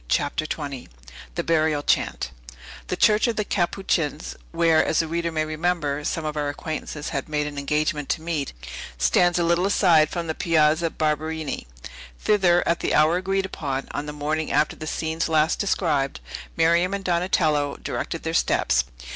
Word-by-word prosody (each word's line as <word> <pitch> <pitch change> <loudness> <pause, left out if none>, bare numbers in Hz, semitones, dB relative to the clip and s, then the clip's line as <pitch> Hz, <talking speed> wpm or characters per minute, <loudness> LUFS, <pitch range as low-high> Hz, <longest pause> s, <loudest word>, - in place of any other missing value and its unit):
CHAPTER 145 - 0
XX 140 -5 -5 0.5
THE - - -1
BURIAL 155 -3 +1
CHANT - - 0 0.6
The - - -2
Church 215 +3 +4
of 235 - 0
the 210 - 0
Capuchins 175 -5 -1 0.2
(where, 165 -1 +4
as - - 0
the 165 - +2
reader 170 +1 -2
may 155 -1 0
remember, 155 -2 -1
some 160 +1 -2
of 155 0 -3
our 145 -1 -1
acquaintances 150 0 -5
had 140 +1 -4
made 150 -1 0
an 145 -1 -5
engagement 150 0 -1
to 160 - -1
meet) 160 -5 -2 0.5
stands 120 - +3
a 175 - +2
little 170 +3 +2
aside 165 -6 +4
from 170 -1 -3
the 160 - -2
Piazza 160 0 +2
Barberini. 155 - -2 0.5
Thither, 180 -4 +3
at 170 - +2
the - - 0
hour 155 +3 +4
agreed 195 +1 0
upon, 135 -7 -4
on 145 - -4
the - - -3
morning 150 +2 -2
after 155 - +2
the 155 - -7
scenes 160 +1 -2
last 160 +1 +2
described, 155 -9 0 0.4
Miriam 170 +4 +3
and 200 - -5
Donatello 170 -5 +1
directed - - -4
their - - -2
steps. - - +2
160 Hz, 170 wpm, -24 LUFS, 150-170 Hz, 0.6 s, Church